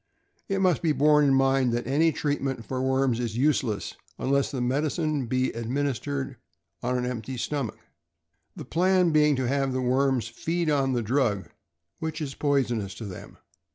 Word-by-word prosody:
It 195 0 0
must 185 -4 +3
be 160 -3 +2
borne 150 +1 +4
in 135 -1 +4
mind 135 -1 +3
that 120 - -1
any 150 +6 +3
treatment 140 -5 -2
for 130 -1 -3
worms 130 -2 +1
is 115 -2 -3
useless 130 -6 0 0.2
unless 140 +1 +1
the 130 - -4
medicine 145 +2 0
be 130 +2 0
administered 115 - -2 0.4
on 125 +1 0
an 125 - -1
empty 125 0 -4
stomach, 135 -2 -3 0.8
the - - -8
plan 180 0 +3
being 150 -1 +4
to 130 -1 -1
have 135 0 0
the 130 - -1
worms 130 -2 +1
feed 165 +8 -1
on 135 -2 +2
the 120 -2 0
drug, 110 -4 0 0.5
which 160 -1 -3
is 145 -4 -4
poisonous 120 -10 0
to 115 - -7
them. 95 -3 -9
135 Hz, 165 wpm, -26 LUFS, 120-150 Hz, 0.8 s, borne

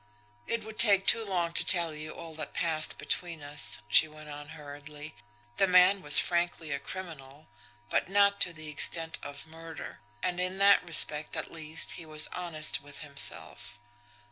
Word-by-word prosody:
"It 230 -1 -3
would 220 0 -12
take 200 -4 +4
too 230 - +4
long 175 -5 -3
to - - +1
tell 170 -3 +3
you 155 +1 -7
all 165 -1 -10
that 155 -2 -9
passed 160 -2 0
between 170 -4 -5
us," 145 -7 -6
she 155 - +5
went 155 0 -14
on 145 0 -10
hurriedly. 150 +1 -12 0.4
"The 195 - +2
man 185 +2 +4
was 145 -2 +6
frankly 170 -3 -1
a 140 - -3
criminal 155 -6 -11 0.4
but - - -2
not 200 0 +1
to 175 - 0
the 155 -2 -11
extent 160 +2 -1
of 145 +1 -9
murder. 165 0 -11 0.2
And 180 -1 -2
in 185 +1 -4
that 200 0 +4
respect, 155 -2 +1
at 155 - -5
least, 160 0 +3
he - - -11
was 155 0 +1
honest 165 -5 -1
with 145 0 -13
himself. 140 -4 +2
160 Hz, 170 wpm, -28 LUFS, 150-180 Hz, 0.4 s, was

